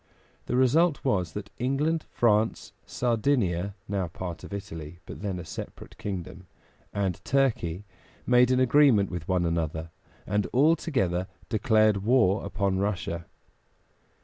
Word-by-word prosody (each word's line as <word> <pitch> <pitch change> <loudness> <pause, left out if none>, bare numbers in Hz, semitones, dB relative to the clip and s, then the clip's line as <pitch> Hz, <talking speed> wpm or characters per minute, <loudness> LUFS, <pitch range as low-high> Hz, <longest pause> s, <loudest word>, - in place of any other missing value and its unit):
The - - -1
result 140 +5 +3
was 90 -10 0
that 100 -1 -6
England, 145 +6 0
France, 110 -1 +1
Sardinia 110 -6 0
(now 95 -2 -1
a - - -8
part 85 0 -6
of - - -9
Italy, 80 -5 -7
but - - -9
then 100 -3 -3
a 90 - -7
separate - - -8
kingdom), 95 -2 -6 0.4
and 95 -4 -2
Turkey 105 -10 0 0.4
made 125 0 +5
an 130 0 +3
agreement 130 -6 +4
with 85 -3 -5
one 90 -2 +1
another, 80 -1 -2 0.3
and 105 +1 0
all 150 +6 +5
together 95 - -1 0.2
declared 110 -2 +3
war 105 -1 +3
upon 95 0 -1
Russia. 90 -4 -2
100 Hz, 135 wpm, -27 LUFS, 90-125 Hz, 0.4 s, made